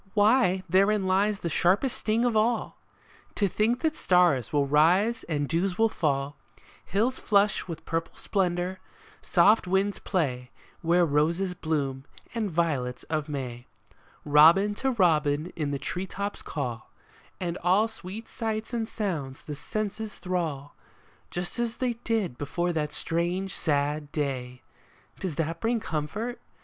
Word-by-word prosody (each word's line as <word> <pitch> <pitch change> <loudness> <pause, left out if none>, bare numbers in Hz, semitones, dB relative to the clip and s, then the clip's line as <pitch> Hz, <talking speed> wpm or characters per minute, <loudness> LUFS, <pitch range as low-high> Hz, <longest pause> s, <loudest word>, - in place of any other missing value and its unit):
Why, 205 -3 +4
therein 195 +3 +3
lies 200 +2 +2
the - - -2
sharpest 195 - +2
sting 225 +2 +1
of 240 -2 +1
all! 230 +2 +1 0.6
To 200 - +2
think 225 +6 +1
that 315 -1 +1
stars 175 - +3
will 145 -2 +2
rise 175 +11 +3
and 145 -3 -1
dews 180 +4 0
will 225 0 +4
fall, 140 -6 -1 0.5
Hills 230 +7 0
flush 205 -2 +2
with 165 -2 -7
purple 165 0 -3
splendor, 185 -1 -1 0.4
soft 195 +3 +4
winds 195 +2 +1
play 130 -9 -1 0.3
Where 175 +1 +3
roses 165 +5 +1
bloom 140 -6 -2 0.3
and 225 -3 -1
violets 150 -7 -1
of 155 -1 -1
May, 125 -4 -5 0.6
Robin 165 +8 +6
to 265 +6 -1
robin 160 - +2
in 150 -4 -2
the 140 - -1
tree 180 +7 -4
tops 200 +2 -4
call, 120 -6 -5 0.5
And 175 -1 -3
all 190 +5 +3
sweet 220 0 -8
sights 220 0 -4
and 225 -2 -2
sounds 155 -11 -4
the 150 - -5
senses 215 +6 -4
thrall, 160 -7 -3 0.6
Just 175 +5 -4
as 235 -1 -1
they 250 -2 0
did 215 - -1
before 175 +5 -1
that 150 -2 -1
strange, 175 +5 -2
sad 145 -1 0
day! 130 -4 -3 0.6
Does 185 -6 -3
that 165 +2 -2
bring 230 +1 +1
comfort 210 +7 -3
180 Hz, 140 wpm, -27 LUFS, 150-210 Hz, 0.6 s, Robin